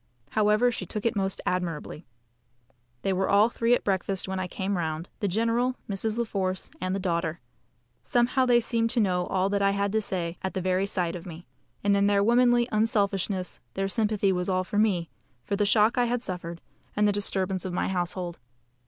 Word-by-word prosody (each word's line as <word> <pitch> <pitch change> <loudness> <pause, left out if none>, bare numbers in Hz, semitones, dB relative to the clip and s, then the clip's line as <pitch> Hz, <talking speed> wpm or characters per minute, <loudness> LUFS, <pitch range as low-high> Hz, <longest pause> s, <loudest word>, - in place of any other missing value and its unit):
However, 215 +3 +3
she 230 - -5
took 210 -1 -5
it 230 0 +1
most 195 -1 -1
admirably. 170 -3 -3 1.0
They 195 - +1
were 190 +1 0
all 205 +3 +5
three 235 0 +2
at - - -4
breakfast 195 -1 -1
when 190 0 -3
I 185 - -2
came 195 +2 -2
round, 160 -1 -3
the 205 - 0
general, 230 +5 +1
Mrs. 215 +2 -2
La 235 - +2
Force, 190 -4 -3
and 185 +1 -1
the - - -1
daughter. 170 -3 -1 0.6
Somehow 255 0 +2
they 240 -1 +5
seemed 230 0 0
to 245 - +2
know 180 -4 +1
all 190 0 +1
that 200 0 +1
I 200 - +4
had 200 0 0
to 220 +1 +1
say 175 -4 -3
at 190 - -4
the - - 0
very 185 +1 +1
sight 180 -3 -1
of 175 +1 -8
me; 170 0 -9 0.4
and 200 0 +3
in 200 0 +3
their 200 0 +3
womanly 240 +1 +4
unselfishness 200 -3 0 0.2
their 195 0 0
sympathy 210 -1 +1
was 180 0 -1
all 185 0 +1
for 205 +3 -2
me, 185 -6 +1 0.3
for 200 - -2
the 205 0 +1
shock 215 +4 +4
I 245 - +4
had 240 0 -1
suffered, 170 -3 -5 0.3
and 210 0 +3
the - - +4
disturbance 190 -2 0
of 185 - -4
my 175 - -1
household. 180 -1 -3
195 Hz, 205 wpm, -27 LUFS, 185-220 Hz, 1.0 s, all